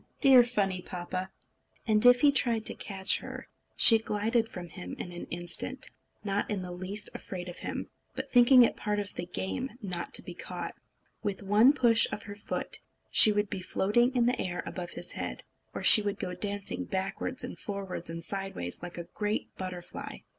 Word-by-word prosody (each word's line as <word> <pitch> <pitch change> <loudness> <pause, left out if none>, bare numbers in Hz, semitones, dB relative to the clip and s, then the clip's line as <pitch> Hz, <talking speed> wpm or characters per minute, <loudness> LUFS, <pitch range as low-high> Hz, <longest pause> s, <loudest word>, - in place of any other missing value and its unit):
Dear, 260 -3 +7
funny 200 -6 -1
papa!" 185 +1 -6 0.6
And 215 -2 +3
if 245 0 +6
he 290 - +6
tried 235 -5 +1
to - - +3
catch 195 -2 +1
her, - - -9 0.3
she 225 -1 +9
glided 225 +2 -1
from 175 -2 -9
him 90 - -8
in 175 - -7
an 175 - -8
instant, 175 +10 -2 0.3
not 200 0 -2
in 200 -4 -3
the 180 - -7
least 190 +4 -3
afraid 180 -2 -7
of 175 - -8
him, - - -5 0.3
but - - -4
thinking 245 +1 +6
it - - +1
part 210 0 -2
of 200 -1 -5
the 175 - -6
game 220 +9 -4
not 180 -6 -3
to - - +5
be - - -9
caught. - - -6 0.5
With 205 -1 -4
one 210 +6 +5
push 235 -5 +5
of 205 - -6
her 205 - -9
foot, 205 - -5 0.3
she 215 - +8
would 205 0 0
be 190 - -4
floating 240 +7 +1
in 240 -1 +2
the 250 +1 0
air 180 -1 -4
above 175 -2 -6
his - - -4
head; - - -6 0.3
or - - -7
she 215 - +10
would 205 -1 -3
go 180 - -5
dancing 200 +2 -3
backwards 195 +7 -4
and 250 - -8
forwards 195 -4 -6
and 165 0 -7
sideways, 195 - -5
like 175 0 -8
a 170 - -5
great 210 +4 -4
butterfly. 185 -2 -7
205 Hz, 190 wpm, -29 LUFS, 185-230 Hz, 0.6 s, she